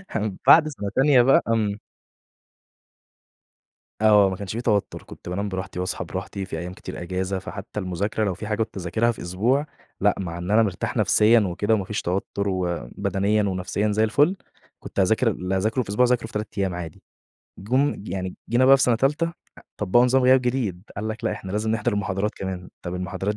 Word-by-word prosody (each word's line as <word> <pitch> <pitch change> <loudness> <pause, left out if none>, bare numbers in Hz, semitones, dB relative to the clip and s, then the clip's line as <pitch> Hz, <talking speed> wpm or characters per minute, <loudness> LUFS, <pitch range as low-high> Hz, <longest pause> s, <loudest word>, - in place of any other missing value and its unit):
هم 105 -3 -2
بعد 155 -1 +8
سّنة 105 -9 -4
تانية 135 -2 +5
بقى 135 +3 +5
آمم 110 -3 0 2.2
آه، 105 -2 +6
ما 95 - -3
كانش 100 +2 -6
في 115 - -2
توتُّر. 105 -4 0
كنت - - -11
بانام 100 +3 -2
براحتي 95 -1 -5
واصحى 90 - -3
براحتي، 95 -1 -5
في 80 - -5
أيام 90 +2 -6
كتير - - -8
إجازة 95 +2 -2
فحتّى 100 +2 -7
المذاكرة 100 +4 -2
لو 100 - 0
في 105 +4 -7
حاجة 105 -1 -1
كنت 100 - -11
أذاكرها 105 +7 +1
في 115 - -9
أسبوع، 115 +12 0 0.4
لأ - - +3
مع 85 -3 -4
إن 90 +3 -4
أنا 110 +1 +5
مرتاح 95 -4 -3
نفسيًا 115 +2 +5
وكده 105 +2 0
وما 100 -3 0
فيش 105 - -3
توتُّر 100 +2 -2
وبدنيًا 95 - -1
ونفسيًا 100 +2 -1
زي 110 +1 +2
الفل، 145 - +3 0.4
كنت - - -6
أذاكر 110 +6 +3
اللي 90 0 -3
هاذاكره 110 +6 0
في 100 - -14
أسبوع، 105 +5 +3
أذاكره 125 -2 +1
في - - -16
3 105 0 -2
أيام 95 -2 0
عادي. 85 -3 -7 0.6
جُم 130 +8 +1
ج 105 - -10
يعني 95 0 -4
جينا 120 +3 +3
بقى 135 +1 +8
في 135 - 0
سَنة 120 - +4
تالتة 150 +6 +1 0.3
أ - - -13 0.2
طبّقوا 105 +5 +3
نظام 130 +1 +3
غياب 130 +1 +6
جديد. 120 -8 -2
قال 110 +2 -3
لك 110 0 -6
لأ - - +1
إحنا 95 0 -7
لازم 110 +1 -1
نحضر 115 +1 0
المحاضرات 100 0 -1
كمان، 95 -2 -5
طَب 90 0 -5
المحاضرات 95 +3 -3
105 Hz, 200 wpm, -24 LUFS, 95-115 Hz, 2.2 s, بعد